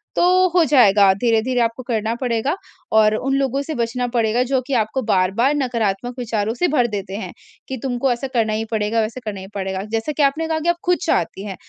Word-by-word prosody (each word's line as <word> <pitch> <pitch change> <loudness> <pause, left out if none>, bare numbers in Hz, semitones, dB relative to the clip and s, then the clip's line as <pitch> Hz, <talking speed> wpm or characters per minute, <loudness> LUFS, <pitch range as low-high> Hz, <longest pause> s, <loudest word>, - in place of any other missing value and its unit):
तो - - +2 0.3
हो 355 -2 +5
जाएगा 205 -8 +5
धीरे-धीरे 235 +4 +1
आपको 230 +2 -1
करना 225 -1 -1
पड़ेगा 245 +6 0 0.4
और 215 0 +5
उन 270 +4 -1
लोगों 275 0 0
से 310 +2 -5
बचना 240 +1 -1
पड़ेगा 230 0 +1
जो 260 +1 0
कि 275 - -3
आपको 225 +3 0
बार-बार 195 +9 +2
नकारात्मक 240 -3 -1
विचारों 220 -2 -1
से 355 +9 0
भर 250 -5 +2
देते 195 -3 -5
हैं - - -6 0.4
कि 265 - -4
तुमको 255 0 0
ऐसा 240 +3 -2
करना 220 -2 +1
ही 220 +1 -2
पड़ेगा, 220 +1 0
वैसे 220 +4 -3
करना 205 -2 -4
ही 190 - -9
पड़ेगा। 190 0 -3
जैसा 225 +6 -1
कि 295 - +3
आपने 310 +4 +1
कहा 320 -1 -1
कि 340 +2 -1
आप 345 - +3
खुद 360 0 +3
चाहती 195 - -1
हैं 195 -2 -5
235 Hz, 215 wpm, -20 LUFS, 215-265 Hz, 0.4 s, हो